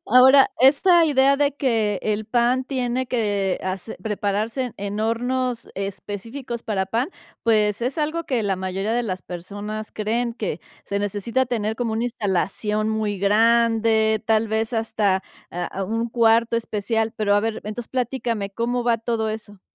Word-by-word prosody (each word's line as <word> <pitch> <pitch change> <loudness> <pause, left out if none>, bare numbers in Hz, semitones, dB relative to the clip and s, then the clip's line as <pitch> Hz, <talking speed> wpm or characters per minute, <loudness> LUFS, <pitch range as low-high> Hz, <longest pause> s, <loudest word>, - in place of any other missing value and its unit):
Ahora, 265 +3 +7
esta 330 +7 +6
idea 275 -2 +4
de 285 -1 +1
que 225 -8 0
el 215 0 -1
pan 245 +3 +2
tiene 255 -1 -1
que 205 -6 0
hacer 190 +3 -4
prepararse 215 +3 -1
en 245 - -6
en 205 +1 -3
hornos 245 +2 -1
específicos 225 +5 -5
para 195 -3 -1
pan, 230 - -1 0.3
pues, 215 -2 +2
es 255 +5 -2
algo 310 +2 -1
que 250 -6 0
la 195 -2 0
mayoría 190 +3 -2
de 240 +1 +1
las 185 -4 -4
personas 205 +5 -6
creen, 230 +3 -1
que 210 -8 -3 0.2
se 200 - -2
necesita 205 +6 -1
tener 220 -3 -2
como 235 -2 -1
una 225 +2 -1
instalación 210 -1 -1
muy 215 -2 -1
grande, 220 +1 +3
tal 220 0 +2
vez 220 +2 -1
hasta, 210 -4 +1 0.3
ah, 180 +2 -4
u - - -7
un 230 +1 -1
cuarto 230 0 +3
especial. 225 0 -1
Pero, 205 -1 +2
a 205 - +4
ver, 225 +1 -1
entonces, 215 +3 -6
platícame, 245 -5 -2
¿cómo 240 +4 -1
va 235 -1 +2
todo 225 -1 -1
eso? 210 -2 -8
225 Hz, 160 wpm, -23 LUFS, 205-245 Hz, 0.3 s, Ahora